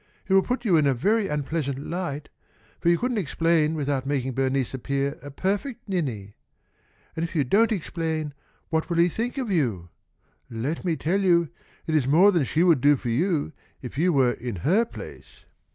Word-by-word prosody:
It 190 Hz, -, +1 dB
will 195 Hz, -, +7 dB
put 250 Hz, +4 st, -3 dB
you 180 Hz, -6 st, +4 dB
in 150 Hz, -2 st, +3 dB
a 135 Hz, -, +2 dB
very 210 Hz, -, +1 dB
unpleasant 150 Hz, -2 st, -2 dB
light, 150 Hz, -1 st, -4 dB, 0.5 s
for 170 Hz, -, +2 dB
you 170 Hz, -, +4 dB
couldn't 245 Hz, 0 st, -1 dB
explain 165 Hz, -2 st, +1 dB
without 140 Hz, -3 st, -1 dB
making 135 Hz, -2 st, -1 dB
Bernice 135 Hz, 0 st, 0 dB
appear 140 Hz, +2 st, -2 dB
a 145 Hz, -, -8 dB
perfect 205 Hz, -, -3 dB
ninny. 125 Hz, -, -3 dB, 0.8 s
And 160 Hz, -, -2 dB
if 170 Hz, +1 st, -5 dB
you 150 Hz, -, +3 dB
don't 215 Hz, -, +3 dB
explain, 160 Hz, -5 st, -2 dB, 0.4 s
what 160 Hz, 0 st, -1 dB
will 170 Hz, -, -1 dB
he 170 Hz, +1 st, +5 dB
think 235 Hz, -, -3 dB
of 250 Hz, -6 st, -2 dB
you? 115 Hz, -, 0 dB, 0.6 s
Let 125 Hz, +8 st, -3 dB
me 175 Hz, -3 st, 0 dB
tell 175 Hz, +6 st, 0 dB
you, 170 Hz, -4 st, +3 dB, 0.4 s
it 160 Hz, -, -2 dB
is 145 Hz, -5 st, +2 dB
more 175 Hz, +9 st, +6 dB
than 170 Hz, -7 st, +1 dB
she 160 Hz, +6 st, +1 dB
would 165 Hz, -8 st, +4 dB
do 145 Hz, +2 st, +5 dB
for 125 Hz, -2 st, -5 dB
you 155 Hz, +4 st, 0 dB, 0.3 s
if 125 Hz, -, -7 dB
you 175 Hz, +6 st, +2 dB
were 130 Hz, -5 st, +3 dB
in 120 Hz, -2 st, -5 dB
her 210 Hz, +8 st, +4 dB
place. -, -, -12 dB
160 Hz, 190 wpm, -25 LUFS, 135-185 Hz, 0.8 s, will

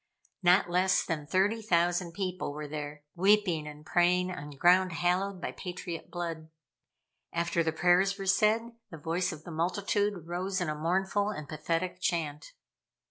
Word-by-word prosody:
Not 180 Hz, +2 st, +5 dB
less 185 Hz, +2 st, +2 dB
than 155 Hz, -4 st, -3 dB
thirty 200 Hz, +7 st, +2 dB
thousand 175 Hz, -3 st, +1 dB
people 185 Hz, -5 st, -3 dB
were 150 Hz, 0 st, -6 dB
there, 145 Hz, 0 st, -6 dB
weeping 185 Hz, -4 st, +3 dB
and 150 Hz, 0 st, -10 dB
praying 180 Hz, +2 st, +2 dB
on 150 Hz, -5 st, -7 dB
ground 175 Hz, +5 st, +4 dB
hallowed 180 Hz, +3 st, 0 dB
by -, -, -4 dB
patriot 175 Hz, -2 st, -6 dB
blood. 165 Hz, -2 st, -5 dB, 0.8 s
After 170 Hz, 0 st, 0 dB
the 160 Hz, -1 st, +1 dB
prayers 180 Hz, +4 st, +3 dB
were 195 Hz, -, -5 dB
said, 215 Hz, +4 st, +2 dB, 0.2 s
the 165 Hz, -, -9 dB
voice 170 Hz, +4 st, -1 dB
of 155 Hz, -2 st, -9 dB
the 175 Hz, -, -9 dB
multitude 190 Hz, +2 st, -1 dB
rose 185 Hz, +2 st, -2 dB
in 175 Hz, -4 st, -1 dB
a 150 Hz, -, -2 dB
mournful 190 Hz, +6 st, 0 dB
and 155 Hz, -8 st, -6 dB
pathetic 165 Hz, +4 st, -2 dB
chant. 155 Hz, -5 st, -2 dB
175 Hz, 155 wpm, -30 LUFS, 160-190 Hz, 0.8 s, Not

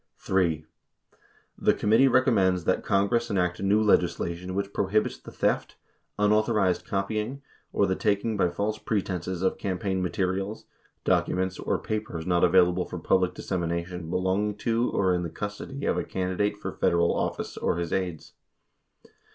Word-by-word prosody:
3. 85 Hz, -5 st, 0 dB, 0.9 s
The -, -, +3 dB
committee 110 Hz, +6 st, +4 dB
recommends 100 Hz, -9 st, +3 dB
that 95 Hz, -, +1 dB
Congress 110 Hz, +4 st, +1 dB
enact 90 Hz, -3 st, 0 dB
new 100 Hz, +2 st, +3 dB
legisla 90 Hz, -4 st, +2 dB
tion 90 Hz, +2 st, -7 dB
which 100 Hz, 0 st, -2 dB
prohibits 105 Hz, +2 st, 0 dB
the -, -, -11 dB
theft, -, -, -1 dB, 0.4 s
unauthorized 105 Hz, -2 st, +2 dB
copying, 110 Hz, +7 st, -2 dB, 0.3 s
or 100 Hz, -, +2 dB
the 95 Hz, -1 st, 0 dB
taking 105 Hz, +2 st, 0 dB
by 95 Hz, -3 st, +2 dB
false 105 Hz, +5 st, -2 dB
pretenses 95 Hz, -3 st, -2 dB
of 95 Hz, -, 0 dB
campaign 95 Hz, -1 st, -1 dB
materials, 95 Hz, +3 st, -2 dB, 0.4 s
documents, 95 Hz, 0 st, +1 dB
or -, -, 0 dB
papers 105 Hz, -7 st, -4 dB
not 90 Hz, -1 st, +2 dB
available 90 Hz, 0 st, +4 dB
for 90 Hz, -, -6 dB
public 90 Hz, +2 st, +1 dB
dissemination 85 Hz, -1 st, -3 dB
belonging 95 Hz, +4 st, 0 dB
to 115 Hz, +2 st, 0 dB
or 95 Hz, -2 st, +2 dB
in 90 Hz, -, 0 dB
the 85 Hz, -, -3 dB
custody 105 Hz, -, -6 dB
of -, -, +1 dB
a -, -, -1 dB
candidate 95 Hz, +3 st, -1 dB
for -, -, -5 dB
Federal 85 Hz, 0 st, +2 dB
office -, -, -2 dB
or -, -, -1 dB
his 85 Hz, -1 st, -2 dB
aides. 90 Hz, -4 st, -3 dB
95 Hz, 150 wpm, -27 LUFS, 90-105 Hz, 0.9 s, committee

